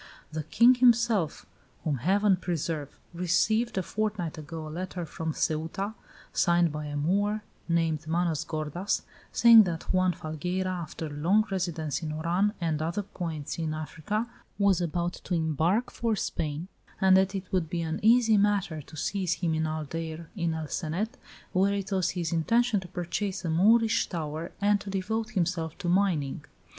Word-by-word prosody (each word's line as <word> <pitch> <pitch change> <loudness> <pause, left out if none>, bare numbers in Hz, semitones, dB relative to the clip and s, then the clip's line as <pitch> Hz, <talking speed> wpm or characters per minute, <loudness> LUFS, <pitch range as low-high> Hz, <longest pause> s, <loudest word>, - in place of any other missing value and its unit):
The 155 0 -3
king 235 - +5
himself 235 -8 +3 0.4
whom 150 -4 0
Heaven 195 - +3
preserve 165 -5 -3 0.2
received, 195 +7 +1
a 190 - +1
fortnight 205 -5 -2
ago, 155 +1 -7
a - - -7
letter 175 +2 -4
from 160 +1 -4
Ceuta, 160 +7 -2 0.4
signed 170 -2 +3
by 150 0 -5
a 145 0 -4
Moor 205 +7 +1 0.3
named 160 -2 +1
Manos 165 -2 0
gordas, 155 +5 -2 0.3
saying 235 -1 +8
that 170 0 -3
Juan 185 0 +3
Falgueira, 180 +4 -3
after 170 -2 -5
long 170 +9 +2
residence 170 -5 -2
in 155 -2 -3
Oran 175 +7 +1
and 160 -3 -1
other 170 +6 -1
points 165 -6 -5
in 155 -1 -1
Africa, 165 +8 -3 0.3
was 200 -3 +3
about 175 +1 -1
to 180 - -1
embark 165 - +1
for 230 -2 0
Spain, 155 -3 -3 0.3
and 190 -1 +6
that 190 +1 +3
it 190 -1 -5
would 180 -4 0
be 170 0 -2
an 160 0 -2
easy 225 0 +5
matter 200 -6 +1
to 155 +2 -13
seize 185 +2 0
him 170 -3 -1
in 160 0 0
Aldeire 160 +1 -4
in 170 -4 -1
El 160 -1 -4
Cenet, 185 - -2 0.4
where 195 +2 +3
it 200 0 -4
was 190 -3 +1
his 170 -3 -1
intention 230 +6 +2
to 185 - -9
purchase 180 +3 -3
a 165 - 0
Moorish 225 +6 +4
tower 160 -1 -4
and 205 0 +3
to 200 - -7
devote 215 +3 -2
himself 170 -5 -1
to - - -5
mining. 170 -7 +1
175 Hz, 165 wpm, -28 LUFS, 160-200 Hz, 0.4 s, saying